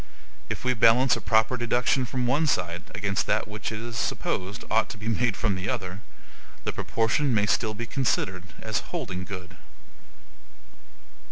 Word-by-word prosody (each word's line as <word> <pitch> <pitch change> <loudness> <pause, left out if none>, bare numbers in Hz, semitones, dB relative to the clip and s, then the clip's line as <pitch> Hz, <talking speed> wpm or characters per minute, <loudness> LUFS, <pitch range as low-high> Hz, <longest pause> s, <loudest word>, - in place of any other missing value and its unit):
If - - -4
we 125 - +3
balance 120 +3 +5
a - - -5
proper 110 +3 +3
deduction 125 +2 +2
from 125 0 -1
one 145 +6 +2
side 90 - 0
against 100 -1 0
that - - +1
which 110 +1 -4
it 110 - -4
is 115 0 -6
supposed 95 +3 -2
ought 110 0 +3
to - - -7
be 110 +1 -7
made 115 -1 +1
from 105 -3 +1
the 95 +2 -3
other, 95 -6 -3 0.6
the - - -2
proportion 115 +3 +1
may 105 -1 +3
still 110 +1 +1
be 120 +3 -4
considered 100 -8 0 0.2
as - - 0
holding 90 0 -3
good. 90 -3 -8
110 Hz, 165 wpm, -27 LUFS, 100-120 Hz, 0.6 s, balance